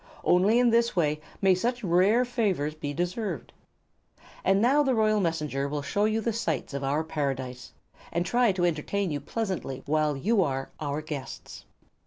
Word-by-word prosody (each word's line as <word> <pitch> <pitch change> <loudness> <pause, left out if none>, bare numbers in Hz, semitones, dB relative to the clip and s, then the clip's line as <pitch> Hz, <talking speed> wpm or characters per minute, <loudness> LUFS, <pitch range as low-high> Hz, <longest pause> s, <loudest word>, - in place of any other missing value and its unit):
Only 195 +6 +4
in 245 -1 +4
this 235 -1 +2
way 150 -3 +1 0.2
may 190 -1 +6
such 240 +6 -1
rare 195 +7 +3
favors 200 - 0
be 150 -2 -5
deserved. 175 - -3 0.9
And 195 +1 +3
now 265 +7 +4
the 265 -3 +2
royal 215 -1 +3
Messenger 150 -6 -1
will 145 0 -3
show 200 +9 0
you 220 +1 +1
the 230 +1 -1
sights 160 - -2
of 140 0 -3
our 145 +3 0
Paradise, 135 -5 -4 0.4
and 170 +1 0
try 240 +3 +3
to 180 -1 +1
entertain 175 +3 -1
you 145 - -2
pleasantly 180 - -4
while 150 -1 +1
you 205 +8 +2
are 135 -5 -2
our 150 0 -3
guests." 145 -4 -7
175 Hz, 170 wpm, -27 LUFS, 145-215 Hz, 0.9 s, may